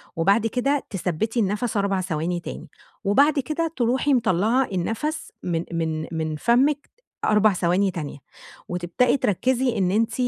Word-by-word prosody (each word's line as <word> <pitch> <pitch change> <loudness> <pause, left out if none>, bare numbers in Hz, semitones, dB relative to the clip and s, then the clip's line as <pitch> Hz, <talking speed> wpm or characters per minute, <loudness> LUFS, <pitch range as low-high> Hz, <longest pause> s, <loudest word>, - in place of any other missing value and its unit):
وبعد 200 +7 +3
كده 275 +4 0
تثبّتي 195 +5 -2
النفس 210 +2 0
4 200 -1 +1
ثواني 175 0 -2
تاني، - - -8 0.3
وبعد 280 +9 +4
كده 315 +4 -2
تروحي 260 +4 +2
مطلعة 230 +3 +2
النفس 225 - -2
من 170 -1 -1
من 160 -1 -2
من 160 -1 -2
فمِّك، 265 - +2 0.4
4 210 -1 +4
ثواني 180 +3 +1
تانية، 155 -5 -6 0.5
وتبدئي 180 +10 +1
تركزي 250 +3 +1
إن 185 -2 +1
أنتِ 225 +3 +1
205 Hz, 135 wpm, -24 LUFS, 175-250 Hz, 0.5 s, وبعد